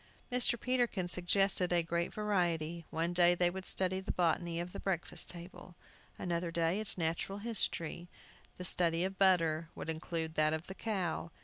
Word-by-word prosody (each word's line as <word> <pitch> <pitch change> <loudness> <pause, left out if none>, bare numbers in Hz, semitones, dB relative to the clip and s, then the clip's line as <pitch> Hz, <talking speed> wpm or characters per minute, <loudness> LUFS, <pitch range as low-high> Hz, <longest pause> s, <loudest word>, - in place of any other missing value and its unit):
Mr. 245 -1 +3
Peterkin 240 -7 0
suggested 180 +1 +3
a 175 -1 +3
great 170 +1 -1
variety. 170 -6 -1
One 165 +2 -1
day 175 0 +5
they 175 0 +2
would 190 +1 -5
study 185 0 +1
the 190 - -3
botany 170 -1 0
of 175 +1 -4
the - - -5
breakfast 185 -4 -1
table, 175 0 -9 0.4
another 170 -1 -2
day, 165 +3 +1
its 215 -3 -4
natural 170 +4 -1
history. 180 -6 -2 0.5
The 180 - -6
study 170 -1 +2
of 190 0 -3
butter 165 -4 +3
would 160 - -3
include 160 0 -3
that 155 0 +2
of 160 +1 -3
the 190 - -7
cow. 190 -6 -2
175 Hz, 170 wpm, -34 LUFS, 165-190 Hz, 0.5 s, day